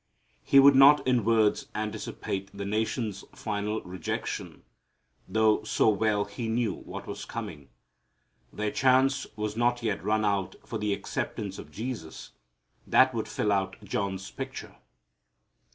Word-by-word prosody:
He 140 - +4
would 140 +1 +8
not 140 +2 +7
in 125 -3 +2
words 110 -1 +2
anticipate 105 -2 -4
the 100 0 -6
nation's 110 -1 -2
final 105 0 -3
rejection, 90 -2 -5 0.6
though 110 -1 +3
so - - +2
well 105 0 +1
He 110 +3 -5
knew 115 0 +1
what - - -8
was - - -6
coming. 70 -3 -7 0.8
Their 105 0 -2
chance 135 +1 +3
was 105 -1 -3
not 120 +1 +1
yet 105 -5 -1
run 110 +1 +1
out 100 -3 0
for - - -4
the 105 0 -1
acceptance 100 0 -3
of - - -10
Jesus 110 -9 -6 0.6
that 130 0 +5
would 110 -2 -2
fill 105 -1 -1
out 95 -1 0
John's 100 -1 -3
picture. - - -7
105 Hz, 135 wpm, -28 LUFS, 100-120 Hz, 0.8 s, would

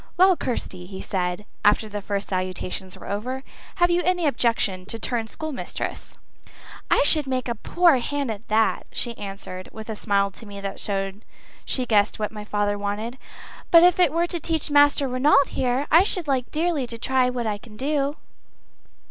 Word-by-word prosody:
"Well, 375 +1 +6
Kirsty," 185 - -4
he 190 0 -8
said, 180 +1 -2 0.2
after 210 +1 +4
the 210 -1 -5
first 200 0 -3
salutations 185 0 -3
were - - -11
over, 250 +6 -3 0.3
"have 350 -2 +3
you 345 +1 +3
any 355 -1 +1
objection 230 -8 +1
to 230 - -4
turn 230 0 -2
schoolmistress?" 310 +2 -5 0.7
"I - - +4
should 295 -1 +4
make 255 -1 -1
a 235 - 0
poor 335 - +3
hand 280 0 -2
at 215 +1 -8
that," 220 +1 +1
she 235 -1 -2
answered, 195 -2 -7
with 220 0 -9
a - - -4
smile 200 -1 +1
to 220 +3 -11
me 200 -1 -8
which 195 0 -5
showed 195 0 -3 0.4
she 255 - 0
guessed 210 -3 +2
what 210 -1 -2
my 210 -1 -7
father 205 -1 -1
wanted. 215 +5 -4 0.5
"But 335 0 +8
if 355 0 +5
it 350 -6 +5
were 335 +2 +1
to 345 0 -3
teach 320 -1 -1
Master 290 -1 +5
Ranald 275 +2 +3
there, 255 +2 0
I 330 - +8
should 370 -4 0
like 260 -3 0
dearly 310 -4 0
to 230 - -7
try 255 +1 +2
what 245 -2 -3
I 210 -2 -2
could 210 -1 -14
do." 285 +2 0
235 Hz, 185 wpm, -24 LUFS, 205-290 Hz, 0.7 s, But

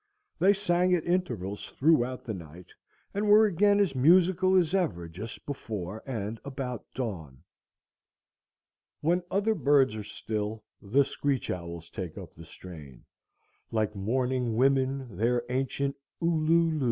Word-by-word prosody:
They 195 - +6
sang 180 -2 +2
at 165 - -2
intervals 165 - -2
throughout 130 -4 +2
the 110 - -4
night, 85 -1 -10 0.5
and 205 +1 0
were 215 +1 +8
again 205 +1 +3
as 195 -7 +2
musical 180 +7 +4
as 175 -2 +3
ever 100 - 0
just 100 +8 -8
before 110 -7 -5
and 110 -3 -4
about 130 -3 -6
dawn. 85 - -5 1.6
When 175 +4 +2
other 205 +3 +1
birds 140 - +3
are 110 - -5
still 105 +1 -4 0.2
the 125 +8 +3
screech 140 -2 -1
owls 85 -2 -6
take 90 -5 -6
up - - -9
the 85 - -12
strain, 80 -7 -12 0.7
like 110 -2 -1
mourning 125 +3 0
women 130 -3 +1
their 120 +3 +1
ancient 135 +2 -1 0.2
u 170 0 +1
lu 165 +1 +3
lu. 155 - -2
130 Hz, 140 wpm, -28 LUFS, 105-170 Hz, 1.6 s, were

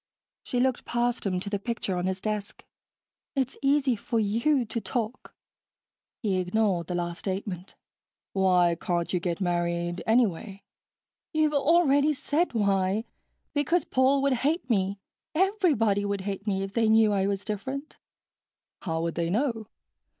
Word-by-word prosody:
She 245 - -2
looked 255 0 +1
past 240 -2 -1
him 185 -2 0
to 200 - -7
the 200 - 0
picture 215 -3 -2
on 180 +1 -1
his 190 0 -2
desk. 210 0 -4 0.7
"It's 265 -1 0
easy 275 -2 +3
for 230 +2 -2
you 235 +6 +2
to 230 +1 -3
talk." 235 0 -4 0.9
He 195 -4 +1
ignored 185 -2 0
the 180 - -3
last 175 0 -3
statement. 190 -1 -4 0.6
"Why 180 -3 +3
can't 175 0 -1
you 180 - +2
get 170 -1 -2
married, 175 -1 -1
anyway?" 210 -4 +1 0.7
"You've 310 -1 +2
already 290 0 +4
said 295 +4 0
why. 200 0 +1 0.5
Because 320 +4 +1
Paul 270 +2 +3
would 280 -1 +3
hate 305 +2 0
me 200 -4 +1 0.4
everybody 315 - +2
would 200 -1 -2
hate 200 +1 -5
me 195 -1 0
if 195 0 -6
they 225 -1 +2
knew 220 -1 +5
I 195 -1 +1
was 200 0 -2
different." 265 +8 -5 0.8
"How 165 -2 -2
would 165 0 -1
they 170 -1 -1
know? 225 +1 -1
210 Hz, 150 wpm, -27 LUFS, 190-260 Hz, 0.9 s, knew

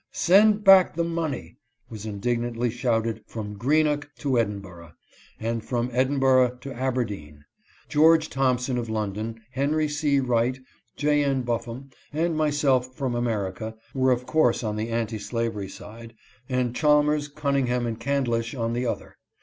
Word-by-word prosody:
" - - -58 0.2
Send 210 +2 +6
back 195 -4 +7
the 170 - +1
money! 160 - -3 0.2
" - - -43
was 110 -1 -7
indignantly 120 +3 -1
shouted 115 -2 -1
from 105 -2 -6
Greenock 150 +5 +1
to 135 -5 +1
Edinburgh, 95 -6 -4 0.5
and 115 0 -2
from 120 0 -2
Edinburgh 130 -1 +3
to 135 +2 -7
Aberdeen. 105 - -3 0.4
George 160 +1 +4
Thompson 130 -2 0
of 115 -2 -5
London, 110 +1 -3
Henry 145 +4 0
C. 150 -1 +1
Wright, 125 0 +1 0.4
J. 150 0 +2
N. 135 -2 0
Buffum 120 +3 -4 0.2
and 160 +2 0
myself 140 -4 +1
from 130 -2 -2
America, 110 -2 -2 0.2
were 130 -1 +2
of 125 0 0
course 130 -6 +2
on 105 -1 -2
the 110 +2 -3
anti 115 -1 -2
slavery 115 -3 -3
side, 115 +3 -11 0.3
and 125 -2 0
Chalmers, 150 0 +3
Cunningham, 140 -4 0
and 115 -1 -4
Candlish 120 -4 -1
on 115 -2 -2
the 120 +1 -1
other. - - -5
125 Hz, 150 wpm, -25 LUFS, 115-145 Hz, 0.5 s, back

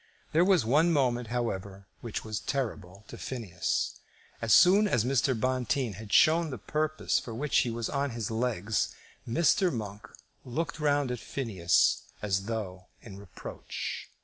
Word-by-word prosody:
There 165 +3 +4
was 185 - +4
one 150 +8 +4
moment, 125 -5 +1
however, 100 -5 -3
which 115 -2 -5
was 110 -1 -3
terrible 105 -8 -4
to - - -10
Phineas. 95 - -2 0.4
As 115 - -1
soon 200 - +7
as 120 - +1
Mr. 130 -2 +1
Bonteen 130 -1 0
had 105 +2 -10
shown 165 +1 +5
the 130 - -5
purpose 155 +7 0
for 115 - -7
which 145 +4 +1
he 125 - +1
was 115 -1 -3
on 140 0 -1
his 115 -3 -4
legs, 110 -3 -1 0.3
Mr. 170 - +3
Monk 105 -4 -6 0.4
looked 160 +6 -3
round 145 -3 +1
at 125 - -3
Phineas, 105 -6 +1 0.2
as 95 -2 -1
though 100 -5 -5 0.2
in 100 -4 -10
reproach. 100 -3 -7
120 Hz, 150 wpm, -29 LUFS, 105-140 Hz, 0.4 s, soon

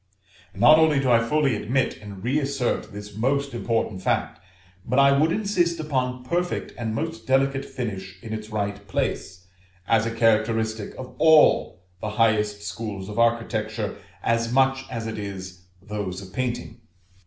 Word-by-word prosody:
Not 155 +1 +7
only 155 -3 +4
do 130 -2 +1
I 115 -1 +5
fully 140 0 +2
admit 125 +6 0
and 100 -2 -9
re 135 +5 +1
assert 135 -6 -1
this 105 0 -9
most 140 +4 0
important 115 -4 -1
fact, 90 - -1 0.4
but 125 +5 -1
I 140 0 +6
would 155 +4 +3
insist 175 -5 +1
upon 130 -4 -2
perfect 175 +7 -2
and 110 -2 -3
most 165 +5 -4
delicate 135 +1 +2
finish 95 -9 -5
in 110 -1 -6
its 110 0 -6
right 100 -1 -3
place, 90 -1 -3 0.4
as 115 -1 +3
a - - -2
characteristic 110 -1 +1
of 130 -1 -8
all 155 - +5 0.2
the 105 - -3
highest 105 -2 +2
schools 105 -3 -5
of 105 +2 -4
architecture, 115 -2 0 0.3
as 115 0 +1
much 135 +1 +2
as 115 -3 -4
it 110 -1 -4
is 95 -3 -7 0.2
those 105 -4 -4
of 95 -2 -11
painting. 120 -2 -3
115 Hz, 155 wpm, -24 LUFS, 105-135 Hz, 0.4 s, Not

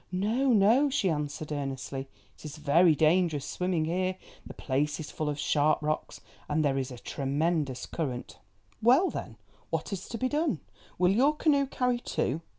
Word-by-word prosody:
"No, 220 +9 +1
no," 230 +7 +5
she 230 -10 +1
answered 150 0 -4
earnestly, 135 -1 -4 0.3
"it - - -18
is 150 0 -7
very 155 +2 +4
dangerous 155 -1 +2
swimming 180 -3 -1
here; 185 +3 -1 0.3
the - - -10
place 145 +2 -1
is 155 - -6
full 155 -1 -2
of 145 - -3
sharp 150 +1 +2
rocks, 155 +1 -3 0.3
and 150 +1 +1
there 135 -1 +1
is 130 0 -3
a 125 - -8
tremendous 140 0 -1
current." 130 -7 -5 0.4
"Well, 270 - +5
then, 115 -3 -6 0.3
what 165 +4 -3
is 190 -1 -6
to 230 - -4
be 255 - 0
done? 295 - 0 0.4
Will 180 +1 +4
your 270 +9 +3
canoe 285 -3 +2
carry 250 -2 0
two? 160 - -2
160 Hz, 170 wpm, -29 LUFS, 145-215 Hz, 0.4 s, no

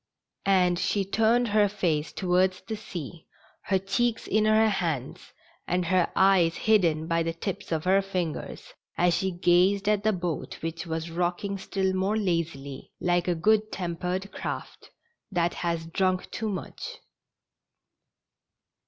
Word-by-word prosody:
And 180 -3 +3
she 200 +1 0
turned 225 +4 +2
her 205 -1 +4
face 165 -6 -1
towards 185 0 +1
the 220 - -5
sea, 175 -6 -8 0.4
her 190 - +2
cheeks 225 +5 0
in 215 +1 +2
her 215 +1 +5
hands 165 - -2 0.4
and 180 0 0
her 180 0 +2
eyes 185 -4 +4
hidden 170 -8 +2
by 165 0 +1
the 165 0 -1
tips 195 +3 -5
of 160 -1 0
her 190 +2 +4
fingers, 185 -5 -4 0.2
as 175 0 +3
she 190 +3 0
gazed 185 +3 +3
at 210 -1 +2
the 215 - +3
boat 175 -5 -4
which 165 +2 -4
was 160 0 -3
rocking 180 +3 -2
still 190 0 -1
more 190 +3 0
lazily, 165 -8 -2
like 175 0 +1
a 175 - +2
good 215 +5 +2
tempered 180 +2 -3
craft - - -6 0.4
that 175 -2 +1
has 170 -2 -2
drunk 185 +2 0
too 220 -1 -3
much. 190 -4 -6
185 Hz, 145 wpm, -27 LUFS, 170-200 Hz, 0.4 s, her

